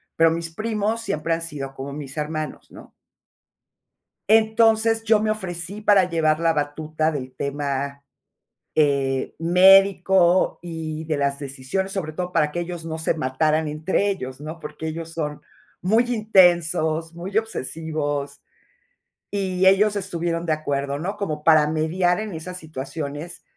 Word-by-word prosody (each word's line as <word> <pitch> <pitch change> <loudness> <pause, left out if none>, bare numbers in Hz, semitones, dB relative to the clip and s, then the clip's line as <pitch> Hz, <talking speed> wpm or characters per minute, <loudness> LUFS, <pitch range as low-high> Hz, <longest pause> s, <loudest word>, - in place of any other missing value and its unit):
Pero 165 0 +4
mis 165 0 -3
primos 215 +2 -1
siempre 165 -6 -1
han 165 - -2
sido 140 -4 -5
como 135 +1 -7
mis 145 0 -8
hermanos, 155 0 -4
¿no? - - -13 1.4
Entonces, 225 0 +4
yo 220 -1 +4
me 215 0 +1
ofrecí 190 0 -4
para 200 -3 +4
llevar 155 -2 +2
la 165 -1 +2
batuta 155 +1 -1
del 130 -3 -5
tema, 140 0 -3 0.7
eh, 140 -3 +1
médico 185 +1 +5
y 160 -2 -5
de 155 -2 -1
las 140 0 0
decisiones, 140 +8 -3
sobre 170 -6 -3
todo 180 +2 -4
para 150 -3 +2
que 175 +2 -2
ellos 170 -1 -6
no 160 0 -4
se 160 - 0
mataran 155 +2 0
entre 155 +7 0
ellos, 130 -10 -4
¿no?, 155 +2 -7
porque 160 +1 -7
ellos 165 +1 -5
son 150 -3 -4 0.4
muy 220 +7 +3
intensos, 175 -6 +3
muy 185 +5 -4
obsesivos, 155 - -3 0.9
y 190 -2 0
ellos 205 +2 +5
estuvieron 170 -3 -2
de 160 - +1
acuerdo, 140 -2 -2
¿no? 195 +6 -4
Como 155 -8 -3
para 155 -1 +5
mediar 175 +5 +1
en 215 -5 -5
esas 180 +3 -6
situaciones 150 +1 -6
165 Hz, 145 wpm, -23 LUFS, 150-190 Hz, 1.4 s, médico